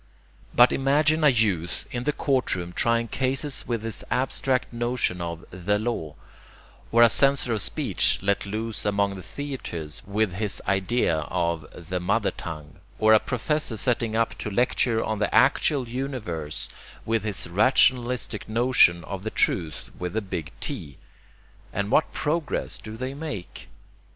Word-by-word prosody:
But 120 +1 +7
imagine 150 +3 +2
a 150 - +7
youth 100 -9 +1
in 120 0 -4
the 150 - +2
courtroom 120 - -1
trying 115 +2 +1
cases 135 +3 -1
with 115 -3 -2
his 115 -2 -4
abstract 130 -1 0
notion 120 -6 -1
of 85 -1 -5
'the' 95 +3 0
law, 105 -9 -3 0.8
or 115 +1 +6
a - - +9
censor 135 +1 +4
of 110 - -1
speech - - +2
let 100 0 +1
loose 110 +2 -2
among 100 -1 +1
the 95 - -8
theatres 110 - -5
with 100 -1 0
his 100 -1 -2
idea 95 -3 +1
of 85 -4 -1 0.2
'the' 90 0 -2
mother 100 +4 +1
tongue, 75 -2 -8 0.2
or 110 0 +5
a 110 - +7
professor 125 0 -1
setting 115 -2 +1
up 115 0 +1
to - - -3
lecture 115 +1 +1
on 110 -1 -2
the 105 - 0
actual 135 -5 +3
universe 115 - -4 0.4
with 115 0 +1
his 105 -5 -2
rationalistic 120 +3 +2
notion 115 -7 +4
of 95 +1 -6
'the 110 - -3
Truth' 80 -7 -1
with 90 +3 -4
a - - +1
big 85 -5 -5
T, 70 -2 -5 0.7
and 100 +1 -2
what 155 - +3
progress 155 0 -2
do 110 0 -9
they 130 +3 -4
make? 140 - -7
110 Hz, 150 wpm, -25 LUFS, 95-125 Hz, 0.8 s, a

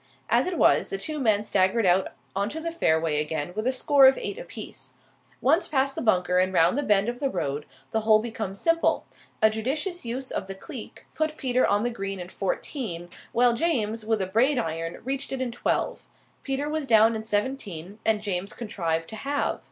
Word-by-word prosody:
As 240 +6 +3
it 365 - -2
was, - - +4
the 390 - -2
two 310 -5 -4
men 215 -5 +2
staggered 205 +2 +2
out 185 +1 +4 0.3
on 200 +2 0
to 315 - -5
the 335 +1 -3
fairway 160 - +2
again 155 +2 -3
with 215 +3 -1
a - - +4
score 270 +1 +5
of 265 - +5
eight 405 - -4
apiece. - - -9 0.5
Once 315 +8 +3
past 275 -1 +1
the - - -4
bunker 180 -5 +2
and 185 +1 +2
round 180 +4 +4
the 290 - +1
bend 210 -5 +3
of 240 +1 -3
the 275 -1 0
road, 145 - -3 0.2
the 220 - +1
hole 215 0 +5
becomes 215 -3 -4
simple. 330 0 +2 0.4
A 220 - +7
judicious 290 - -2
use 255 +3 -4
of - - -3
the 195 - -6
cleek 240 - -9
put 315 0 -1
Peter 255 -1 +2
on 205 +1 +2
the 240 - 0
green 195 -3 -4
in 180 0 -7
fourteen, 190 - -3 0.2
while 240 0 +4
James, 230 -7 0
with 220 -2 0
a - - -1
Braid 240 +9 +2
iron, 165 -6 -3
reached 270 +1 -3
it 270 - -2
in 255 -2 -2
twelve. - - -1 0.3
Peter 275 +1 -2
was 305 -2 -2
down 225 -1 +6
in 220 - -4
seventeen, 205 -4 -3
and 215 -1 +1
James 195 -1 -2
contrived 165 -8 -2
to 220 - -7
halve. 280 +5 -1
220 Hz, 205 wpm, -26 LUFS, 195-270 Hz, 0.5 s, A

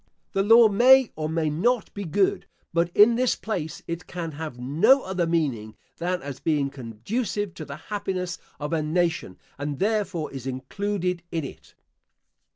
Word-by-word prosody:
The 195 - +2
law 225 +3 +7
may 250 +4 +6
or 155 0 -3
may 160 -1 0
not 225 +8 0
be 200 -1 -5
good; 190 +4 +1 0.3
but, 170 0 +2
in 215 +3 +7
this 255 0 +2
place, 175 -8 -4
it 170 +1 -5
can 170 -2 -5
have 155 -4 -6
no 165 - +4
other 185 -2 -1
meaning, 130 -11 -1 0.2
than 180 0 -2
as 140 -2 -6
being 145 -4 0
conducive 175 - -3
to 155 - -8
the 140 - -7
happiness 185 0 -4 0.2
of 150 +2 -3
a 160 - +1
nation, 165 - -1 0.2
and 145 0 -3
therefore 200 -6 -1
is 135 -1 -6
included 180 +7 -2
in 165 -3 -2
it. - - -12
170 Hz, 165 wpm, -25 LUFS, 150-205 Hz, 0.3 s, law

